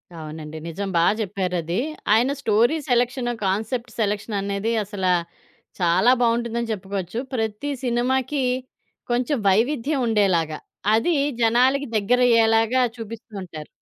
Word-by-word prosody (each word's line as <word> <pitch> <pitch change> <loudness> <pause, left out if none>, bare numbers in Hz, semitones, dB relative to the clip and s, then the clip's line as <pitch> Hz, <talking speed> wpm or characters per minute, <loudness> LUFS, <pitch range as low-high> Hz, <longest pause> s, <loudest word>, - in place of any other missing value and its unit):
అవునండి. 155 -1 -8
నిజం 195 +4 -4
బాగా 170 +4 +4
చెప్పారది. 180 -3 -2 0.3
ఆయన 240 +5 +3
స్టోరీ 225 +6 +3
సెలక్షన్, 245 0 +1 0.2
కాన్సెప్ట్ 220 +5 -2
సెలక్షన్ 210 0 -1
అనేది 200 +3 -2
అసలా 190 -2 -1 0.7
చాలా 185 +7 +4
బాగుంటుందని 235 0 0
చెప్పుకోవచ్చు. 195 0 -4 0.2
ప్రతి 225 +4 -2
సినిమాకి 260 +3 0 0.7
కొంచెం 250 +4 +1
వైవిధ్యం 265 +7 +1
ఉండేలాగా, 185 -8 +1 0.4
అది 230 +10 +2 0.3
జనాలకి 255 +5 +3
దగ్గరయ్యేలాగా 225 +1 +3 0.2
చూపిస్తూ 225 0 -9
ఉంటారు. 155 -4 -9
225 Hz, 105 wpm, -23 LUFS, 195-240 Hz, 0.7 s, బాగా